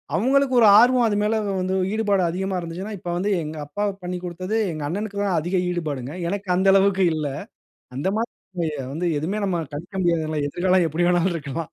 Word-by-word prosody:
அவுங்களுக்கு 265 Hz, +5 st, +2 dB
ஒரு 220 Hz, -, +7 dB
ஆர்வம் 245 Hz, 0 st, +5 dB
அது 205 Hz, -1 st, 0 dB
மேல 220 Hz, +1 st, +1 dB, 0.3 s
வந்து, 185 Hz, +1 st, -1 dB, 0.2 s
ஈடுபாடு 205 Hz, -4 st, +1 dB
அதிகமா 190 Hz, +2 st, -2 dB
இருந்துச்சுன்னா, 180 Hz, +5 st, -6 dB
இப்ப 175 Hz, -, -6 dB
வந்து 200 Hz, +3 st, -1 dB
எங்க 155 Hz, +1 st, -6 dB
அப்பா 205 Hz, +7 st, -3 dB, 0.2 s
பண்ணிக்குடுத்தது, 180 Hz, +3 st, -3 dB, 0.2 s
எங்க 155 Hz, -1 st, -5 dB
அண்ணனுக்கு 200 Hz, +2 st, -4 dB
தான் 190 Hz, -4 st, +1 dB
அதிக 180 Hz, +3 st, -1 dB
ஈடுபாடுங்க. 145 Hz, -7 st, -3 dB, 0.2 s
எனக்கு 200 Hz, -1 st, -4 dB
அந்த 190 Hz, +1 st, +2 dB
அளவுக்கு 195 Hz, -1 st, +4 dB
இல்ல. 150 Hz, -2 st, -2 dB, 0.7 s
அந்த 145 Hz, -, -1 dB
மாதிரி 230 Hz, +2 st, -2 dB, 0.6 s
வந்து 175 Hz, +3 st, -2 dB
எதுவுமே 190 Hz, +8 st, -2 dB
நம்ம 180 Hz, -3 st, 0 dB, 0.2 s
கணிக்க 175 Hz, +6 st, -8 dB
முடியாதுல! 160 Hz, -3 st, 0 dB
எதிர்காலம் 180 Hz, +2 st, +2 dB
எப்பிடி 170 Hz, +3 st, 0 dB
வேணாலும் 175 Hz, 0 st, +2 dB
இருக்கலாம். 150 Hz, +1 st, -4 dB
185 Hz, 175 wpm, -23 LUFS, 170-205 Hz, 0.7 s, ஒரு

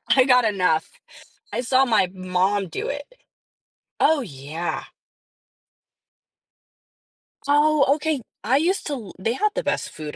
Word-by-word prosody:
I 260 Hz, -, +6 dB
got 250 Hz, -2 st, +5 dB
enough. 180 Hz, -7 st, +1 dB, 0.6 s
I -, -, -1 dB
saw 255 Hz, +2 st, +3 dB
my 220 Hz, -7 st, +2 dB
mom 185 Hz, +1 st, 0 dB
do -, -, -4 dB
it. 285 Hz, 0 st, -4 dB, 1.0 s
Oh, 315 Hz, -2 st, +4 dB
yeah. 160 Hz, -, -5 dB, 2.6 s
Oh, 295 Hz, 0 st, +4 dB
okay. 310 Hz, -2 st, -2 dB, 0.2 s
I 245 Hz, +6 st, +3 dB
used 350 Hz, +6 st, 0 dB
to 295 Hz, -, -2 dB
l 225 Hz, -8 st, -7 dB
they 225 Hz, +5 st, 0 dB
had 425 Hz, +11 st, +1 dB
the -, -, -2 dB
best -, -, -1 dB
food 150 Hz, -1 st, -8 dB
240 Hz, 130 wpm, -23 LUFS, 185-285 Hz, 2.6 s, I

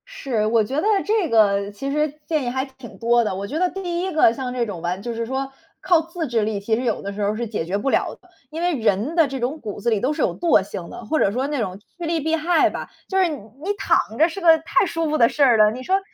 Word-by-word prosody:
是， 265 Hz, -, -2 dB
我 220 Hz, 0 st, +3 dB
觉 255 Hz, +6 st, -5 dB
得 -, -, -2 dB, 0.2 s
这 415 Hz, -5 st, +1 dB
个 200 Hz, -2 st, +3 dB
其 275 Hz, +7 st, -5 dB
实 300 Hz, 0 st, -1 dB
建 310 Hz, -3 st, 0 dB
议 245 Hz, -, -1 dB
还 260 Hz, +2 st, -2 dB
挺 265 Hz, -3 st, -13 dB
多 235 Hz, 0 st, +3 dB
的。 210 Hz, -, -2 dB
我 200 Hz, +1 st, -4 dB
觉 295 Hz, -, -4 dB
得 365 Hz, 0 st, +2 dB
第 350 Hz, -1 st, -3 dB
一 375 Hz, +1 st, -2 dB
个 310 Hz, -8 st, +4 dB
像 250 Hz, 0 st, -4 dB
这 245 Hz, -2 st, 0 dB
种 195 Hz, -6 st, -6 dB
完 180 Hz, +3 st, -2 dB
就 235 Hz, +2 st, -4 dB
是 230 Hz, 0 st, -3 dB
说 265 Hz, +2 st, -3 dB, 0.3 s
靠 350 Hz, -4 st, +3 dB
自 330 Hz, 0 st, -5 dB
制 235 Hz, -2 st, +1 dB
力 210 Hz, -1 st, -1 dB
其 220 Hz, +3 st, 0 dB
实 245 Hz, -, -2 dB
有 230 Hz, -4 st, -1 dB
的 200 Hz, 0 st, -5 dB
时 205 Hz, -, -5 dB
候 205 Hz, +1 st, 0 dB
是 235 Hz, +1 st, -3 dB
解 205 Hz, -6 st, -3 dB
决 185 Hz, +4 st, -1 dB
不 240 Hz, +7 st, -1 dB
了 -, -, 0 dB
的， 365 Hz, -, -24 dB, 0.2 s
因 315 Hz, +2 st, -6 dB
为 350 Hz, -1 st, +1 dB
人 220 Hz, -, 0 dB
的 325 Hz, -4 st, +4 dB
这 270 Hz, -1 st, -5 dB
种 260 Hz, +6 st, -2 dB
骨 210 Hz, -3 st, -6 dB
子 235 Hz, -, 0 dB
里 220 Hz, -3 st, +1 dB
都 255 Hz, +7 st, 0 dB
是 300 Hz, -, -3 dB
有 -, -, 0 dB
惰 330 Hz, -, +3 dB
性 180 Hz, -3 st, -7 dB
的， 235 Hz, -, -9 dB
或 310 Hz, +8 st, 0 dB
者 195 Hz, -, +3 dB
说 255 Hz, +5 st, -1 dB
那 290 Hz, -2 st, -2 dB
种 195 Hz, -4 st, -3 dB, 0.2 s
趋 345 Hz, -, -5 dB
利 330 Hz, 0 st, 0 dB
避 320 Hz, +2 st, 0 dB
害 325 Hz, +1 st, +3 dB
吧， -, -, -6 dB, 0.2 s
就 385 Hz, -, -2 dB
是 375 Hz, -1 st, +4 dB
你 315 Hz, -, -3 dB
你 270 Hz, -, -5 dB
躺 330 Hz, -, +1 dB
着 320 Hz, -, +5 dB
是 355 Hz, +3 st, -7 dB
个 330 Hz, -2 st, +7 dB
太 335 Hz, +4 st, +1 dB
舒 330 Hz, -2 st, -2 dB
服 310 Hz, -, +1 dB
的 230 Hz, -3 st, +5 dB
事 295 Hz, -, +1 dB
儿 245 Hz, -4 st, +5 dB
了， 215 Hz, 0 st, +5 dB
你 250 Hz, +3 st, -7 dB
说 380 Hz, +7 st, +2 dB
260 Hz, 315 characters per minute, -22 LUFS, 220-325 Hz, 0.3 s, 个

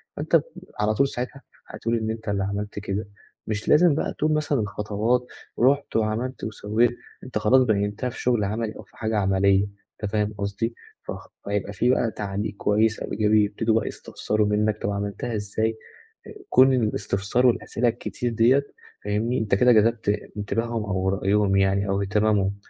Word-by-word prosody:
فأنت -, -, +2 dB, 0.4 s
على 105 Hz, +1 st, +2 dB
طول 140 Hz, +6 st, +3 dB
ساعتها 125 Hz, +1 st, -5 dB, 0.3 s
هتقول 115 Hz, +1 st, -2 dB
إن 110 Hz, -1 st, -2 dB
أنت 110 Hz, -1 st, -6 dB
اللي 100 Hz, -1 st, 0 dB
عملت 100 Hz, +1 st, -3 dB
كده، 100 Hz, +1 st, -3 dB, 0.4 s
مش 105 Hz, 0 st, -3 dB
لازم 160 Hz, 0 st, +6 dB
بقى -, -, -2 dB
تقول 155 Hz, +1 st, +1 dB
مثلًا 150 Hz, -3 st, +1 dB
الخطوات، 105 Hz, +3 st, 0 dB, 0.3 s
رُحت 140 Hz, +4 st, +2 dB
وعملت 115 Hz, +4 st, -1 dB
وسوّيت، 110 Hz, +2 st, +1 dB, 0.3 s
أنت 125 Hz, -4 st, -4 dB
خلاص 125 Hz, +5 st, +4 dB
بيّنتها 105 Hz, +1 st, 0 dB
في 125 Hz, -, -9 dB
شُغل 120 Hz, -4 st, +2 dB
عملي 110 Hz, +2 st, -2 dB
أو -, -, -10 dB
في -, -, -24 dB
حاجة 110 Hz, -1 st, -1 dB
عملية، 95 Hz, 0 st, +3 dB, 0.4 s
أنت 105 Hz, -, -2 dB
فاهم 105 Hz, -1 st, 0 dB
قصدي؟ 100 Hz, +4 st, -2 dB, 0.3 s
فخ -, -, -7 dB, 0.2 s
فيبقى 100 Hz, 0 st, -2 dB
في 120 Hz, +5 st, +1 dB
بقى 120 Hz, -3 st, +2 dB
تعليق 100 Hz, 0 st, -4 dB
كويس 110 Hz, +2 st, +2 dB
أو -, -, -6 dB
إيجابي، 105 Hz, 0 st, +3 dB
يبتدوا 110 Hz, +2 st, 0 dB
بقى -, -, -5 dB
يستفسروا 105 Hz, -1 st, -2 dB
منك 105 Hz, +1 st, 0 dB
"طَب -, -, -1 dB
عملتها 100 Hz, +4 st, -3 dB
إزاي؟" 110 Hz, +2 st, -1 dB, 0.5 s
آآ، -, -, -9 dB, 0.2 s
كل 130 Hz, +1 st, +6 dB
الاستفسار 105 Hz, 0 st, 0 dB
والأسئلة 120 Hz, 0 st, 0 dB
الكتير 120 Hz, +1 st, -3 dB
ديّة 125 Hz, +5 st, +4 dB, 0.4 s
فاهمني، 110 Hz, +5 st, 0 dB
أنت 105 Hz, -3 st, +1 dB
كده 125 Hz, +5 st, +5 dB
جذبت 115 Hz, -1 st, +3 dB, 0.3 s
انتباههم 115 Hz, +2 st, -2 dB
أو 95 Hz, -2 st, -1 dB
رأيهم 100 Hz, +1 st, +2 dB
يعني 100 Hz, +1 st, +2 dB
أو 100 Hz, +1 st, +1 dB
إهتمامهم، 100 Hz, -1 st, +1 dB
110 Hz, 165 wpm, -24 LUFS, 100-115 Hz, 0.5 s, لازم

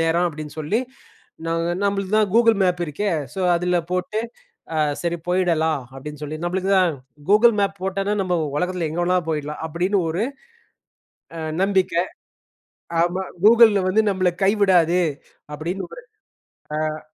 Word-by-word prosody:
நேரம் 170 Hz, +2 st, +2 dB
அப்படீன்னு 155 Hz, -2 st, -6 dB
சொல்லி 155 Hz, +9 st, 0 dB, 0.7 s
நாங்க 165 Hz, +1 st, 0 dB, 0.2 s
"நம்பளுக்கு 200 Hz, 0 st, -1 dB
தான் 210 Hz, -3 st, +2 dB
கூகுள் 230 Hz, -2 st, +5 dB
மேப் 180 Hz, -1 st, +1 dB
இருக்கே. 200 Hz, +8 st, -2 dB, 0.3 s
ஸோ, 190 Hz, -, -4 dB
அதுல 180 Hz, +1 st, +1 dB
போட்டு 185 Hz, +4 st, -1 dB, 0.5 s
அ -, -, -1 dB, 0.3 s
சரி 170 Hz, 0 st, -1 dB
போயிடலாம்." 160 Hz, -5 st, +1 dB
அப்படீன்னு 150 Hz, +2 st, -8 dB
சொல்லி, 155 Hz, +1 st, -5 dB
"நம்பளுக்கு 190 Hz, +2 st, -1 dB
தான் 180 Hz, -3 st, +3 dB, 0.4 s
கூகுள் 220 Hz, +2 st, +6 dB
மேப் 200 Hz, 0 st, 0 dB
போட்டோன்னா, 195 Hz, +2 st, -1 dB
நம்ப 180 Hz, -2 st, 0 dB, 0.2 s
உலகத்தில 180 Hz, -1 st, -1 dB
எங்க 170 Hz, -, -2 dB
வேணாலும் 180 Hz, -2 st, +1 dB
போயிடலாம்." 150 Hz, 0 st, -4 dB
அப்படீன்னு 180 Hz, +5 st, 0 dB
ஒரு 185 Hz, +7 st, -1 dB, 1.1 s
அ -, -, -5 dB, 0.2 s
நம்பிக்கை. 190 Hz, -3 st, +2 dB, 1.0 s
ஆமா, 180 Hz, +2 st, 0 dB, 0.2 s
"கூகுள்ல 220 Hz, -3 st, +7 dB
வந்து 220 Hz, +4 st, +3 dB
நம்பள 185 Hz, -2 st, +1 dB
கைவிடாது." 185 Hz, -4 st, +4 dB, 0.5 s
அப்படீன்னு 175 Hz, +5 st, -4 dB
ஒரு, -, -, -10 dB, 0.9 s
அ. -, -, -9 dB
180 Hz, 135 wpm, -22 LUFS, 165-195 Hz, 1.1 s, கூகுள்ல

